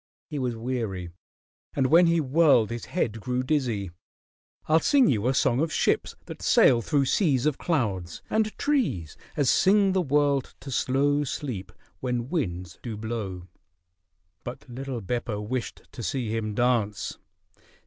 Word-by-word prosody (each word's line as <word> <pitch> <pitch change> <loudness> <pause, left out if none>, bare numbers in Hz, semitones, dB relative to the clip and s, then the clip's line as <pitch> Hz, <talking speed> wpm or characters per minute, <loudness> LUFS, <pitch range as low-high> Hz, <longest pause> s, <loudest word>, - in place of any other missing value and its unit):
He 150 - -3
was 125 -3 -1
weary, 115 -7 -3 0.6
and 135 - +2
when 170 +6 +6
he 170 0 +3
whirled 140 -6 +4
his 120 0 -5
head 115 - -2
grew 125 +1 -1
dizzy. 125 - -1 0.7
"I'll 160 +1 +4
sing 270 - +4
you 110 - +1
a 130 - +2
song 125 -1 +2
of 160 +1 0
ships - - +1
that - - -9
sail 120 - +5
through 140 +3 +1
seas 140 - +2
of 150 -3 +1
clouds; 100 - -2
and 215 0 0
trees 230 - 0 0.2
as 145 - +2
sing 195 - +4
the 190 0 +2
world 145 -3 +1
to 135 +1 -8
slow 140 +4 +1
sleep 120 -9 -5 0.3
when 125 -1 -2
winds 90 - -3
do 115 -4 -5
blow." 105 -5 -5 1.0
But - - -8
little 130 0 -5
Beppo 115 0 -3
wished 120 +4 -4
to - - -8
see 115 -2 -2
him 110 -2 -3
dance. 115 -5 0
125 Hz, 150 wpm, -26 LUFS, 110-145 Hz, 1.0 s, when